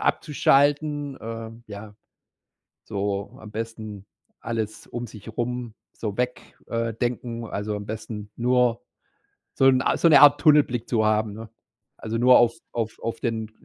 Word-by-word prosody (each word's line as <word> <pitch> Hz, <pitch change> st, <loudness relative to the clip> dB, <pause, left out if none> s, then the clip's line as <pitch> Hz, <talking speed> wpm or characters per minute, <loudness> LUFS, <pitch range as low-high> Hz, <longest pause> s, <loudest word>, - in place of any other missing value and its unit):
abzuschalten, 145 Hz, -1 st, +2 dB
äh, 115 Hz, 0 st, -6 dB, 0.2 s
ja, 105 Hz, +1 st, -9 dB, 0.9 s
so 100 Hz, -1 st, -3 dB
am 110 Hz, -1 st, -11 dB
besten 110 Hz, -2 st, -6 dB, 0.3 s
alles 110 Hz, -2 st, -4 dB
um 120 Hz, 0 st, -5 dB
sich 110 Hz, 0 st, -11 dB
rum 120 Hz, -1 st, -3 dB, 0.2 s
so 105 Hz, -3 st, -5 dB
weg 125 Hz, 0 st, -3 dB
äh, 115 Hz, 0 st, -2 dB
denken. 120 Hz, 0 st, -3 dB
Also, 105 Hz, 0 st, -3 dB
am 105 Hz, 0 st, -6 dB
besten 110 Hz, -1 st, -6 dB
nur 125 Hz, -1 st, +2 dB, 0.7 s
so -, -, +2 dB
'n 130 Hz, -1 st, +5 dB
A -, -, +1 dB
so 170 Hz, -, +4 dB
'ne 145 Hz, -4 st, +8 dB
Art 145 Hz, 0 st, +8 dB
Tunnelblick 145 Hz, -7 st, +4 dB
zu 110 Hz, -3 st, +2 dB
haben, 110 Hz, 0 st, +1 dB
ne? 110 Hz, +2 st, -9 dB, 0.5 s
Also, 110 Hz, 0 st, -4 dB
nur 125 Hz, +1 st, +7 dB
auf 120 Hz, -1 st, +4 dB, 0.2 s
auf 115 Hz, -2 st, -3 dB
auf 115 Hz, -, -4 dB
den 110 Hz, -3 st, -2 dB
115 Hz, 150 wpm, -24 LUFS, 110-125 Hz, 0.9 s, ne